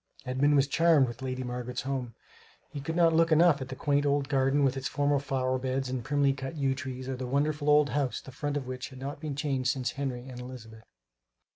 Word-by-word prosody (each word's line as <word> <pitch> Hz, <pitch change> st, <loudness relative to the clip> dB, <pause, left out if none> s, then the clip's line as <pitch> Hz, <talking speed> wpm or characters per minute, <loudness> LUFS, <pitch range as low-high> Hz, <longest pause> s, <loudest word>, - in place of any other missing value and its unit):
Edmund 135 Hz, +3 st, +2 dB
was 140 Hz, -1 st, +5 dB
charmed 155 Hz, -1 st, +4 dB
with 120 Hz, +1 st, -8 dB
Lady 130 Hz, -1 st, -3 dB
Margaret's 125 Hz, 0 st, -4 dB
home. 130 Hz, -3 st, -3 dB, 0.6 s
He 145 Hz, -, -6 dB
could 160 Hz, +3 st, -4 dB
not 170 Hz, -1 st, +4 dB
look 165 Hz, +1 st, +3 dB
enough 160 Hz, -2 st, +5 dB
at 130 Hz, -, -4 dB
the 130 Hz, -, -5 dB
quaint 145 Hz, +1 st, +1 dB
old 140 Hz, -1 st, +1 dB
garden 135 Hz, 0 st, +2 dB
with 135 Hz, -1 st, +2 dB
its 135 Hz, 0 st, -3 dB
formal 145 Hz, -1 st, +1 dB
flower 130 Hz, -2 st, -1 dB
beds 130 Hz, 0 st, -2 dB
and 130 Hz, -2 st, -3 dB
primly 140 Hz, +1 st, +2 dB
cut 135 Hz, +3 st, -6 dB
yew 135 Hz, -3 st, +1 dB
trees, 130 Hz, -1 st, -6 dB
or 135 Hz, -, -2 dB
the 130 Hz, 0 st, -5 dB
wonderful 145 Hz, +2 st, 0 dB
old 150 Hz, -1 st, +5 dB
house, 135 Hz, -5 st, 0 dB
the 130 Hz, -, -12 dB
front 145 Hz, +3 st, -3 dB
of 140 Hz, -, -4 dB
which 130 Hz, 0 st, -5 dB
had 130 Hz, -, -12 dB
not 140 Hz, +2 st, -6 dB
been 150 Hz, -2 st, -4 dB
changed 135 Hz, -3 st, 0 dB
since 130 Hz, -2 st, -1 dB
Henry 130 Hz, -3 st, -4 dB
and 125 Hz, -2 st, -8 dB
Elizabeth. 115 Hz, -3 st, -10 dB
135 Hz, 230 wpm, -29 LUFS, 130-145 Hz, 0.6 s, was